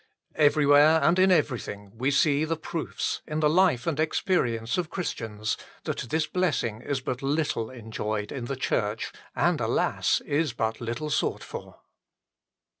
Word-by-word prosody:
Everywhere 150 Hz, +1 st, +5 dB
and 175 Hz, +2 st, +4 dB
in 190 Hz, 0 st, +5 dB
everything 120 Hz, -, 0 dB
we 130 Hz, +4 st, 0 dB
see 145 Hz, +1 st, +3 dB
the 160 Hz, +1 st, -1 dB
proofs, 160 Hz, 0 st, -3 dB
in 155 Hz, 0 st, -2 dB
the 155 Hz, -, +4 dB
life 160 Hz, -6 st, +3 dB
and 155 Hz, -3 st, -1 dB
experience 125 Hz, -, 0 dB
of 170 Hz, -3 st, -2 dB
Christians, 110 Hz, -, -3 dB, 0.3 s
that 120 Hz, -, -4 dB
this 160 Hz, 0 st, +1 dB
blessing 150 Hz, -12 st, -1 dB
is 140 Hz, 0 st, -2 dB
but 125 Hz, 0 st, -3 dB
little 140 Hz, -5 st, 0 dB
enjoyed 110 Hz, -3 st, -4 dB
in 130 Hz, -4 st, -4 dB
the 135 Hz, -, -3 dB
Church, 110 Hz, -4 st, -1 dB, 0.2 s
and, -, -, +2 dB
alas! -, -, +1 dB
is 145 Hz, -2 st, 0 dB
but 110 Hz, 0 st, -2 dB
little 120 Hz, +6 st, -3 dB
sought -, -, 0 dB
for. -, -, -9 dB
140 Hz, 150 wpm, -27 LUFS, 115-155 Hz, 0.3 s, Everywhere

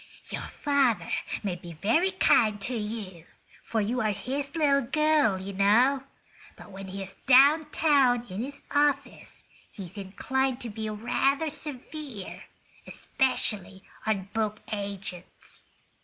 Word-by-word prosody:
"Your -, -, -3 dB
father 280 Hz, -6 st, +1 dB, 0.3 s
may 195 Hz, -4 st, -1 dB
be 175 Hz, -1 st, -10 dB
very 225 Hz, -, +2 dB
kind 220 Hz, -, +3 dB
to 245 Hz, +6 st, 0 dB
you, 210 Hz, -6 st, -5 dB, 0.4 s
for 225 Hz, -, -1 dB
you 235 Hz, +5 st, -1 dB
are 215 Hz, -, +1 dB
his 275 Hz, +7 st, -4 dB
little 285 Hz, -3 st, +3 dB
girl, 295 Hz, -4 st, +2 dB
you 190 Hz, +1 st, -6 dB
know. 240 Hz, +8 st, +3 dB, 0.5 s
But -, -, -13 dB
when 195 Hz, 0 st, -8 dB
he's 195 Hz, 0 st, -7 dB
down 285 Hz, +4 st, +6 dB
town 270 Hz, -7 st, +3 dB
in 190 Hz, +3 st, -5 dB
his 280 Hz, +2 st, -8 dB
office 285 Hz, -1 st, 0 dB, 0.3 s
he's 195 Hz, 0 st, -8 dB
inclined 260 Hz, +7 st, -1 dB
to 235 Hz, -, -5 dB
be 220 Hz, +1 st, -4 dB
rather 275 Hz, +8 st, 0 dB
severe, 280 Hz, -6 st, -7 dB, 0.4 s
especially 200 Hz, -7 st, -1 dB, 0.2 s
on 195 Hz, -3 st, -1 dB
book 215 Hz, -1 st, -1 dB
agents. 200 Hz, -3 st, -6 dB
230 Hz, 125 wpm, -27 LUFS, 200-280 Hz, 0.5 s, down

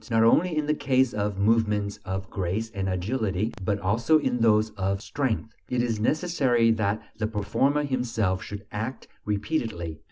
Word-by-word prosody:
Not 115 Hz, -1 st, +4 dB
only 160 Hz, +8 st, +4 dB
in 150 Hz, -, +1 dB
the 150 Hz, -, +2 dB
case 130 Hz, -3 st, +2 dB
of 105 Hz, -1 st, -1 dB
movements 105 Hz, -1 st, +1 dB
of 95 Hz, 0 st, -3 dB
grace 100 Hz, +4 st, -2 dB
and 95 Hz, -2 st, -2 dB
agility, 100 Hz, +2 st, -1 dB
but 100 Hz, +1 st, 0 dB
also 115 Hz, +11 st, +3 dB
in 125 Hz, -5 st, 0 dB
those 110 Hz, -1 st, +3 dB
of 95 Hz, -1 st, -1 dB
strength, 115 Hz, -1 st, -2 dB, 0.2 s
it 125 Hz, -1 st, +1 dB
is 115 Hz, -3 st, -1 dB
necessary 130 Hz, -4 st, +2 dB
that 110 Hz, -1 st, 0 dB, 0.2 s
the 110 Hz, -, 0 dB
performer 135 Hz, +7 st, +1 dB
himself 115 Hz, -8 st, 0 dB
should 105 Hz, 0 st, -7 dB
act 110 Hz, +5 st, -4 dB, 0.2 s
repeatedly. 105 Hz, -, -2 dB
110 Hz, 160 wpm, -26 LUFS, 100-125 Hz, 0.2 s, Not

